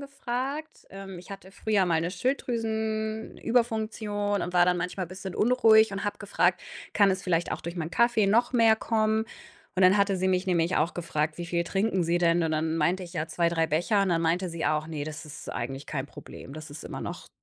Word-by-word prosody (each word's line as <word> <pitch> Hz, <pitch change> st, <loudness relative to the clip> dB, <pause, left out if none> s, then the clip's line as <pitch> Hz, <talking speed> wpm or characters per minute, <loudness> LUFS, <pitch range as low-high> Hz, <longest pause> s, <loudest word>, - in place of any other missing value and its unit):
gefragt, 275 Hz, +2 st, -5 dB
ähm, 195 Hz, -1 st, -8 dB
ich 180 Hz, +3 st, -13 dB
hatte 195 Hz, -1 st, -9 dB
früher 205 Hz, 0 st, +1 dB
mal 165 Hz, -2 st, +2 dB
'ne 170 Hz, +2 st, -2 dB
Schilddrüsenüberfunktion 220 Hz, -1 st, -1 dB
und 180 Hz, -, -4 dB
war 175 Hz, 0 st, +6 dB
dann 180 Hz, 0 st, +2 dB
manchmal 180 Hz, +1 st, -3 dB
bisschen 185 Hz, +1 st, -7 dB
unruhig 220 Hz, -3 st, +5 dB
und 195 Hz, -, -4 dB
habe 205 Hz, 0 st, -2 dB
gefragt: 200 Hz, -, +1 dB, 0.3 s
„Kann 200 Hz, -2 st, +4 dB
es 190 Hz, 0 st, -2 dB
vielleicht 175 Hz, -2 st, 0 dB
auch -, -, -4 dB
durch 170 Hz, +2 st, -6 dB
mein 160 Hz, -1 st, -3 dB
Kaffee 235 Hz, 0 st, +3 dB
noch 235 Hz, +5 st, +3 dB
mehr 225 Hz, -3 st, +5 dB
kommen?“, 220 Hz, 0 st, +1 dB, 0.5 s
und 190 Hz, -, +3 dB
dann 185 Hz, +2 st, +6 dB
hatte 200 Hz, -1 st, +2 dB
sie 185 Hz, +1 st, 0 dB
mich 185 Hz, +1 st, +1 dB
nämlich 175 Hz, -1 st, +1 dB
auch 155 Hz, +3 st, +1 dB
gefragt: 155 Hz, -2 st, -2 dB
„Wie 175 Hz, -, -4 dB
viel 170 Hz, 0 st, 0 dB
trinken 195 Hz, 0 st, 0 dB
Sie 170 Hz, +1 st, +1 dB
denn?“, 170 Hz, 0 st, +3 dB
und 160 Hz, -, 0 dB
dann 160 Hz, +1 st, 0 dB
meinte 175 Hz, +4 st, +1 dB
ich: 175 Hz, -1 st, -9 dB
„Ja 160 Hz, -3 st, -2 dB
2, 170 Hz, +1 st, +1 dB
3 165 Hz, -1 st, +1 dB
Becher.“, 175 Hz, +7 st, +2 dB
und 195 Hz, -, 0 dB
dann 165 Hz, -2 st, +1 dB
meinte 175 Hz, +3 st, +1 dB
sie 165 Hz, -1 st, -4 dB
auch: 155 Hz, +1 st, 0 dB
„Ne, 155 Hz, -3 st, -4 dB
das 155 Hz, 0 st, -8 dB
eigentlich 135 Hz, +3 st, -5 dB
kein 140 Hz, -2 st, -3 dB
Problem. 135 Hz, -, -11 dB
Das 155 Hz, -1 st, -9 dB
ist 145 Hz, +2 st, -9 dB
immer -, -, -6 dB
noch“ -, -, -6 dB
185 Hz, 215 wpm, -27 LUFS, 165-220 Hz, 0.5 s, war